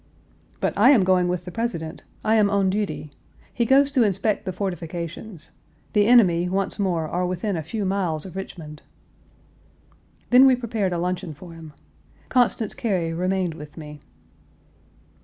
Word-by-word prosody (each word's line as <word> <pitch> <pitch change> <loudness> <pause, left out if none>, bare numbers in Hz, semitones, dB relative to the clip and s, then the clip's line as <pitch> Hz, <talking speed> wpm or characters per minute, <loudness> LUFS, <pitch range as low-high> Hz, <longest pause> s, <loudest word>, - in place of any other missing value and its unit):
"But - - 0
I 215 +6 +6
am 250 -9 +6
going 185 -1 +3
with 180 -1 -2
the 180 - -7
President. 175 -7 -4 0.2
I 220 - +3
am 215 -2 +4
on 200 -2 +2
duty. 200 -7 -3 0.4
He 235 - 0
goes 275 +2 +4
to 270 -3 +2
inspect 210 0 0
the 185 - -2
fortifications. 175 0 -6 0.4
The 205 -1 +3
enemy, 180 -8 +5
once 195 +3 -2
more, 175 -5 0
are 180 +3 -2
within 185 +3 -2
a 165 - -2
few 200 +7 -4
miles 185 -5 -1
of 190 - -10
Richmond." 160 -5 -8 1.5
Then 255 +2 +8
we 260 - +5
prepared 225 -6 -2
a 175 - -1
luncheon 180 -2 -3
for 170 +3 -12
him. 160 -2 -11 0.6
Constance 240 -3 +1
Cary 180 -7 -1
remained 185 0 -1
with 150 -1 -11
me. 150 -2 -9
185 Hz, 160 wpm, -23 LUFS, 170-215 Hz, 1.5 s, Then